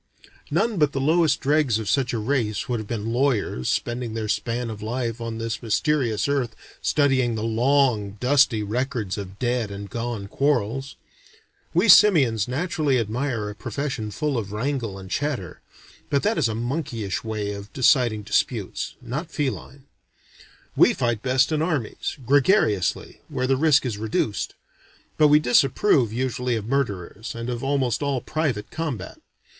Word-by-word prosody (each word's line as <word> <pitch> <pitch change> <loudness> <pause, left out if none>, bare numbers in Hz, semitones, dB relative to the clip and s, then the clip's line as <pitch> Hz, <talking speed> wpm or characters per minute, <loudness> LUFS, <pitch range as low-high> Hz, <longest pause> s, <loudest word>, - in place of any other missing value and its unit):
None 225 -3 +1
but 150 -2 +3
the 135 - -1
lowest 160 +3 +2
dregs 145 -5 +2
of 110 -2 -5
such 130 +2 +1
a 120 - -1
race 115 +1 -1
would 120 -3 -1
have 110 - -7
been 115 0 -3
lawyers 120 - 0
spending 120 -1 -2
their 110 -1 -3
span 115 +2 -2
of 105 -1 -8
life 115 +1 -3
on 115 -1 -4
this 115 0 -3
mysterious 120 -1 +1
earth 135 -5 -1 0.3
studying 130 -5 +2
the 110 - -3
long 115 -3 +1
dusty 125 -4 +3
records 115 -2 -2
of 95 -1 -8
dead 120 -2 -1
and 100 0 -8
gone 115 -4 -4
quarrels. 135 +1 -1 0.8
We 180 +6 +3
simians 145 - +6
naturally 150 0 0
admire 115 0 -2
a 105 - -5
profession 120 +1 -4
full 145 +3 -1
of 100 -3 -6
wrangle 115 -2 -2
and 95 -1 -9
chatter. 125 - -3 0.5
But 140 - +1
that 215 +2 +2
is - - +2
a 110 - -3
monkeyish 120 - -3
way 110 -2 -3
of 100 0 -9
deciding 120 -4 +3
disputes, - - -1
not 150 +8 -4
feline. 140 -2 -4 0.9
We - - +5
fight 120 -3 0
best 130 +3 +2
in 155 -1 +1
armies, 155 -9 -2
gregariously, 135 - +2
where 130 - -2
the 135 +1 +2
risk 145 -1 +3
is 110 -5 -3
reduced; 110 -2 -2 0.6
but 155 - +7
we 150 0 +6
disapprove 135 - +3
usually 125 0 -1
of 110 -2 -3
murderers, 110 -5 -3
and 115 +1 -4
of 120 +1 -4
almost 135 -3 0
all 140 -2 0
private 135 -8 -2
combat. 140 - -5
125 Hz, 155 wpm, -24 LUFS, 110-140 Hz, 0.9 s, but